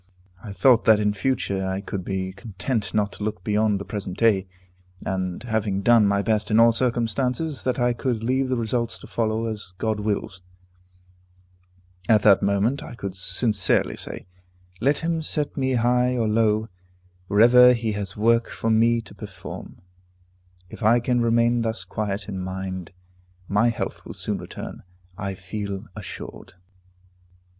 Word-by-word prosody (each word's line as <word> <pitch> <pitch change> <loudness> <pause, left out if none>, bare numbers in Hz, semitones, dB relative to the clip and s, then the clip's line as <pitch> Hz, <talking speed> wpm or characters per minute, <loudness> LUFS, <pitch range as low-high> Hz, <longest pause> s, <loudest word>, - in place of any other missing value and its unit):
I 105 - -7
thought 120 +3 +4
that 110 -2 +6
in 105 -1 +1
future 100 -4 -1
I 95 0 -2
could 100 -1 -5
be 95 0 -3
content 105 +3 -4
not 105 -1 +1
to - - -6
look 105 -4 -3
beyond 105 0 +1
the 100 - -6
present 100 -3 -5
duty, 100 -5 +3 0.6
and, 95 0 -3
having 110 -4 -1
done 115 -2 +5
my 100 0 +1
best 105 -1 0
in 110 +1 +4
all 115 0 +7
circumstances, 125 +5 -1
that 130 - -1
I 120 -1 +2
could 120 -2 -2
leave 130 +2 +1
the 130 - 0
results 115 0 -1
to - - -12
follow 110 0 -1
as 105 -5 -5
God 110 0 -1
wills. 100 -3 -3 1.7
At 105 -2 +5
that 100 -2 +6
moment 100 +7 +1
I - - -9
could 100 -5 -5
sincerely 95 +2 +1
say, - - -6 0.5
"Let 140 +6 +2
him 165 -1 -1
set 150 -1 -2
me 130 -2 0
high 125 +1 +2
or 115 -2 +1
low, 110 0 +2 0.6
wherever 125 +5 +7
he 115 -2 -1
has 100 -1 -5
work 115 +2 +3
for 115 - -2
me 115 +1 +3
to 110 - -14
perform." 95 -3 -10 0.8
If 95 - -12
I 115 +2 +5
can 120 0 +1
remain 115 +1 +3
thus 110 -4 -2
quiet 100 +2 -4
in 95 -2 -5
mind, 95 -1 -5 0.6
my 105 +4 +3
health 115 - -4
will - - -9
soon - - -3
return, - - -8 0.3
I 100 0 -4
feel 100 +2 -5
assured. - - -9
110 Hz, 160 wpm, -24 LUFS, 100-120 Hz, 1.7 s, all